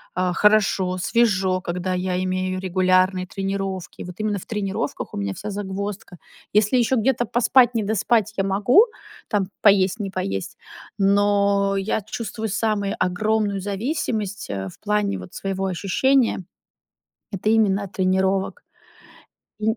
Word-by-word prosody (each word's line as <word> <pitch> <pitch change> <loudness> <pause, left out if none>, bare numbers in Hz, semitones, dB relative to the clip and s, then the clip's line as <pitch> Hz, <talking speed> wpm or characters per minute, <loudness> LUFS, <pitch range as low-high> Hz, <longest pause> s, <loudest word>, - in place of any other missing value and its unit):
а, 180 0 +1
хорошо, 195 -3 +3
свежо, 190 -3 +2
когда 180 +1 -3
я 180 0 -1
имею 185 0 -1
регулярные 185 0 +2
тренировки. 195 -1 -4
Вот 180 0 -9
именно 215 -1 -1
в - - -12
тренировках 195 -8 -3
у - - -5
меня 100 -1 -2
вся 210 - -6
загвоздка. 200 -2 -5 0.4
Если 210 +4 +3
еще 245 +2 +2
где-то 240 +1 +1
поспать, 245 +2 +4
не 225 - +2
доспать- 215 +1 +1
я 195 - +2
могу, 205 - +4 0.4
там 200 -3 -1
поесть, 195 0 +4
не 200 -2 -3
поесть, 95 - -4 0.4
но 200 0 +3
я 195 +3 -1
чувствую 220 +1 -5
самую 210 -1 -1
огромную 205 +2 0
зависимость, 205 - -3
э, 95 -1 -4
в - - -16
плане 210 -1 0
вот - - -11
своего 195 0 -3
ощущения- 225 +6 +1 0.9
это 195 +1 -2
именно 205 -3 +3
от 195 - -10
тренировок. 190 - 0 1.0
М, 220 +2 +1
200 Hz, 135 wpm, -22 LUFS, 185-215 Hz, 1.0 s, поспать